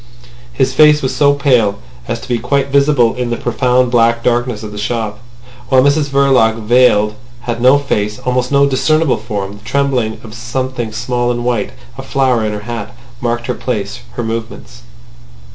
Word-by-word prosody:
His 130 +2 0
face 150 +1 +5
was 130 - -1
so 145 -1 +3
pale 125 -8 +2 0.3
as - - -3
to - - -10
be 120 -2 -1
quite 140 +4 0
visible 140 -4 +3
in 125 -1 -3
the 120 - -2
profound 125 +1 +1
black 115 -1 +2
darkness 120 -2 0
of 105 - -7
the 105 - -7
shop; 105 -1 -3 0.5
while 130 -1 +5
Mrs 145 +1 +2
Verloc, 135 -5 +3
veiled, 110 -2 +3 0.3
had 120 -1 -4
no 130 +3 +6
face, 105 -7 -2
almost 125 0 -1
no 140 0 +4
discernible 155 +2 +1
form. 100 -3 -5
The - - -22
trembling 130 -4 -1
of 110 -2 -10
something 120 0 -4
small 120 +2 -2
and 120 0 -2
white, 120 - -1 0.3
a - - -3
flower 130 -4 +1
in 110 - -1
her 105 0 -5
hat, 115 0 -7 0.2
marked 120 0 -2
her - - -1
place, - - -4
her 120 - -4
movements. 115 - -6
120 Hz, 180 wpm, -15 LUFS, 115-130 Hz, 0.5 s, no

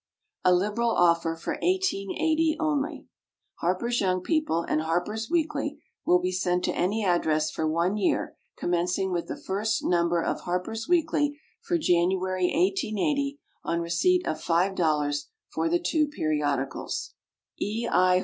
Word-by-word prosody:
A 180 - +5
LIBERAL 210 +6 +2
OFFER 170 -5 +3
FOR 165 - -4
1880 320 - +1
ONLY. 305 -1 -1 0.5
HARPER'S 210 +8 0
YOUNG 185 -2 +1
PEOPLE 305 - 0
and 155 - 0
HARPER'S 175 - -2
WEEKLY 300 -3 -1 0.3
will 180 - +6
be 180 +1 -1
sent 180 -1 0
to - - 0
any 205 +4 0
address 155 -4 +2
for 160 - -1
one 170 +5 +1
year, 200 - 0 0.2
commencing 180 +2 0
with 175 -1 -2
the - - -5
first 215 +3 -1
Number 170 -1 +2
of - - -2
HARPER'S 180 +6 -3
WEEKLY 315 -4 +1 0.2
for 345 - 0
January, 185 - +1
1880, 285 - 0 0.2
on 170 - -1
receipt 355 - +2
of - - -2
$5.00 160 -5 +1 0.2
for 160 +1 -1
the 175 - +3
two 305 - +1
Periodicals. 150 - -2 0.5
E. 225 +3 -2
I. 185 0 +4
185 Hz, 140 wpm, -27 LUFS, 170-285 Hz, 0.5 s, will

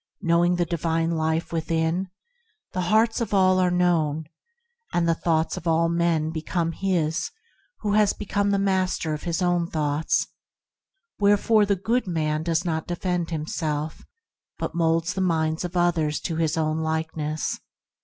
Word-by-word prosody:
Knowing 175 -1 +3
the 175 0 +1
Divine 165 0 0
Life 160 +1 -1
within, 165 +3 0 0.6
the 185 - -1
hearts 220 +6 +2
of 215 -3 -1
all 185 -1 +4
are 180 -1 +3
known, 165 -4 +1 0.7
and 175 -1 +2
the 165 - +4
thoughts 160 -1 0
of 170 - -6
all 165 0 +3
men 170 -2 +1
become 165 +1 -2
his 165 -3 -1 0.5
who 205 -1 0
has 210 -1 +4
become 205 0 -1
the 200 - +2
master 185 -4 0
of 150 - -4
his 170 +1 -1
own 175 -1 +1
thoughts; 150 -1 0 0.9
wherefore 205 +1 +4
the 200 - +3
good 225 +5 0
man 155 -3 0
does 165 +2 0
not 160 -2 -2
defend 175 -1 -2
himself, 155 -1 -3 0.5
but - - -3
moulds 165 +1 +1
the 190 - -2
minds 160 -3 0
of 180 0 -4
others 165 -4 +1
to 165 - -3
his 160 -1 0
own 155 0 0
likeness. 160 -1 -2
170 Hz, 155 wpm, -25 LUFS, 160-180 Hz, 0.9 s, all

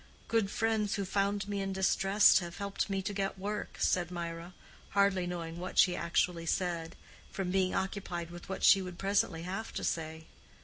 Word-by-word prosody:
"Good 225 -3 +1
friends 220 -2 0
who 200 -2 -2
found 200 +1 0
me 200 -1 -2
in 195 0 -2
distress 195 +2 +5
have 175 -2 -7
helped 200 +1 -2
me 195 -1 -1
to 205 - -3
get 195 -1 -2
work," 205 +2 -4
said 175 -2 +2
Mirah, 170 0 -6 0.4
hardly 195 -3 +3
knowing 170 -1 -5
what 185 +1 -6
she 180 -2 +6
actually 170 0 0
said, 170 -2 -1 0.3
from 190 -3 -3
being 190 -1 +1
occupied 180 -3 -3
with 175 +1 -10
what 190 - -4
she 195 - +7
would 180 -2 -7
presently 195 -4 0
have 195 +5 -4
to - - -4
say. 160 -1 -3
190 Hz, 180 wpm, -32 LUFS, 175-200 Hz, 0.4 s, she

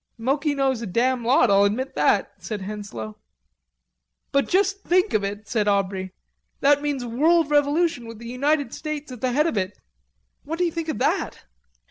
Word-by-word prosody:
"Moki 280 +5 0
knows 265 -3 +1
a 230 - -4
damn 245 +5 +1
lot, 245 -2 +4
I'll 200 0 +5
admit 230 +7 0
that," - - +2
said 215 -3 -5
Henslowe. 190 - -7 1.1
"But 280 - +1
just 395 +1 +2
think 365 +4 +2
of 210 - +2
it," 205 +1 -5
said 215 -4 0
Aubrey, 190 -2 0 0.5
"that 285 +1 +4
means 285 -4 -2
world 300 +6 +2
revolution 290 -3 +2
with 230 -1 -9
the 235 - -11
United 280 +2 0
States 300 -2 -5
at 250 -3 -9
the 255 - 0
head 295 +5 +2
of 330 - -1
it. 185 0 -2 0.7
What 320 +3 -4
do 355 - +2
you 340 - 0
think 330 -1 -4
of 310 - -2
that?" - - -1
255 Hz, 180 wpm, -24 LUFS, 210-300 Hz, 1.1 s, I'll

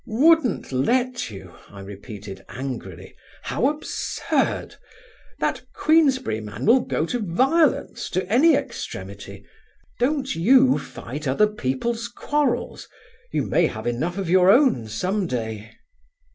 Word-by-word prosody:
"'Wouldn't 270 - +3
let 245 - 0
you'? 95 -4 -11 0.2
I 100 0 -11
repeated 100 0 -9
angrily. 115 -9 -7 0.3
"How 260 - 0
absurd! 295 +1 -2 0.6
That - - -1
Queensberry 275 - +2
man 105 +2 -6
will 240 +4 +6
go 160 - -1
to 245 +8 -2
violence, 265 - +1
to 185 0 -2
any 270 - +5
extremity. - - -6 0.5
Don't 270 +2 0
you 255 +10 +4
fight 145 +5 -7
other 135 +11 +3
people's 210 - -2
quarrels: 290 +4 -2 0.4
you - - 0
may - - +2
have - - -7
enough 155 +10 -2
of 195 -3 -3
your 185 +1 +5
own 235 - +4
some 185 - -1
day." 110 -5 -4
185 Hz, 120 wpm, -23 LUFS, -, 0.6 s, will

